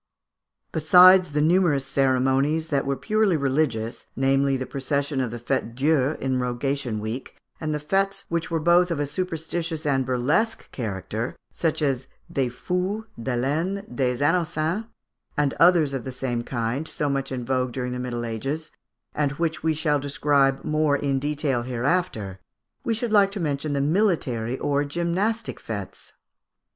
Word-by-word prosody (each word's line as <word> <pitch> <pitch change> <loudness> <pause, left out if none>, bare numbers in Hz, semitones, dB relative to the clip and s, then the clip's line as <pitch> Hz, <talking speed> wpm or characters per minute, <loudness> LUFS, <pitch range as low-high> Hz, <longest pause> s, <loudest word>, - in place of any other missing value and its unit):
] - - -55
Besides 180 +1 +7
the 150 - +2
numerous 160 -4 +3
ceremonies 135 +4 +1
which 140 -1 +2
were 140 0 0
purely 215 -1 +1
religious, 130 -5 -1
namely, 135 +1 +2
the 130 - -3
procession 140 +1 -1
of 125 - -1
the 120 +1 -6
Fête 120 -1 -2
Dieu, 145 +1 +2
in 130 -1 0
Rogation 125 -1 -2
week, 110 +5 -6 0.2
and 155 -1 -2
the 150 - 0
fêtes 195 +5 0
which 170 0 -2
were 165 - 0
both 175 +3 +4
of 165 -4 -2
a 145 - +1
superstitions 165 0 -3
and 135 -2 +2
burlesque 130 - 0
character, 110 0 -4 0.2
such 160 -2 -1
as 135 -2 0 0.3
des 130 -3 +1
Fous, 180 - -2 0.2
de 125 +1 -1
l'Ane, 165 +10 -1
des 125 0 +1
Innocents, 165 +4 0 0.5
and 145 -2 +2
others 165 -5 +5
of 135 -3 -3
the 130 - -5
same 125 -2 -2
kind, 120 +5 -2
so 150 - -2
much 135 -1 -1
in 125 -2 -3
vogue 130 0 0
during 125 0 -3
the 125 - -4
Middle 120 -1 -3
Ages, 135 +8 -4 0.4
and 145 -2 0
which 160 +1 -2
we 160 0 +1
shall 150 -1 +1
describe 140 -1 +1
more 155 -1 +2
in 140 -1 0
detail 145 -3 -1
hereafter, 120 - -1 0.4
we 230 - 0
should 235 0 -2
like 200 -2 +5
to 205 - -4
mention 145 -2 -1
the 140 - +1
military 140 - +1
or 145 +1 0
gymnastic 175 +9 -1
fêtes. 100 -4 -7
145 Hz, 160 wpm, -24 LUFS, 130-165 Hz, 0.5 s, Besides